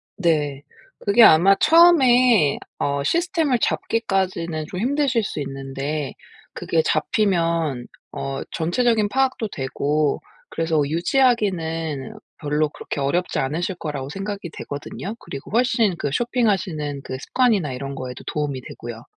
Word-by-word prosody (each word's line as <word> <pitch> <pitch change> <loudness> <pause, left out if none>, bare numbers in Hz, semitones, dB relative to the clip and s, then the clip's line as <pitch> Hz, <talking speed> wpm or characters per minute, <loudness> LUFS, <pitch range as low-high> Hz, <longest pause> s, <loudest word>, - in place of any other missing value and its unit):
네. 150 -6 0 0.4
그게 205 +3 +5
아마 185 +1 +7
처음에 255 - +5 0.2
어 140 0 0
시스템을 325 - +1
잡기까지는 185 -7 -1
좀 180 - -5
힘드실 260 0 +1
수 195 - -4
있는데 135 +1 -4 0.4
그게 165 - 0
잡히면 165 - 0 0.3
어 135 0 -4
전체적인 215 +6 +1
파악도 260 -2 0
되고 145 +2 -1 0.3
그래서 160 -2 0
유지하기는 165 - 0 0.3
별로 150 0 0
그렇게 150 - -6
어렵지 155 +6 0
않으실 165 +8 -2
거라고 145 -5 -5
생각이 195 +2 -5
되거든요. 165 +8 -6
그리고 135 - -9
훨씬 230 -4 +2
그 145 - -1
쇼핑하시는 185 - -1
그 130 - -5
습관이나 205 - +1
이런 135 +2 -5
거에도 125 -1 -7
도움이 145 -3 -2
되고요. 120 -1 -9
165 Hz, 305 characters per minute, -22 LUFS, 145-225 Hz, 0.4 s, 아마